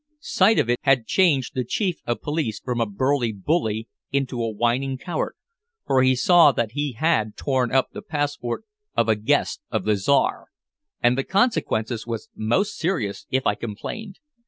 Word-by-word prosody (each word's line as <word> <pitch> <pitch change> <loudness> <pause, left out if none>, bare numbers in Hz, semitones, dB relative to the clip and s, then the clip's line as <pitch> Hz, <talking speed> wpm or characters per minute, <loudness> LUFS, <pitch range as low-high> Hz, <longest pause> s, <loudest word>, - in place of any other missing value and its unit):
Sight 220 - +3
of - - +2
it 120 0 +1
had 135 -4 +3
changed 150 -8 +2
the 130 - -1
Chief 180 - -1
of 120 - -2
Police 150 -8 -2
from 125 -2 -2
a 115 - +1
burly 125 +3 0
bully 110 - -1 0.2
into 135 -3 -1
a 115 - -1
whining 120 +5 0
coward, 175 +6 -3 0.5
for 130 - +3
he 130 0 +4
saw 175 +6 +6
that 115 -2 -1
he 145 +1 -2
had 110 -6 0
torn 130 -4 0
up 130 0 +2
the - - -7
passport 145 - -3 0.3
of 115 -1 +3
a 110 - +4
guest 105 +1 0
of - - -1
the 105 0 +3
Czar, 120 +8 +1 0.6
and 120 +1 +4
the 135 - 0
consequence 125 - 0
was 115 -2 -5
most 190 - 0
serious 155 - -2
if 130 0 0
I - - +3
complained. 120 - -6
130 Hz, 175 wpm, -23 LUFS, 115-145 Hz, 0.6 s, saw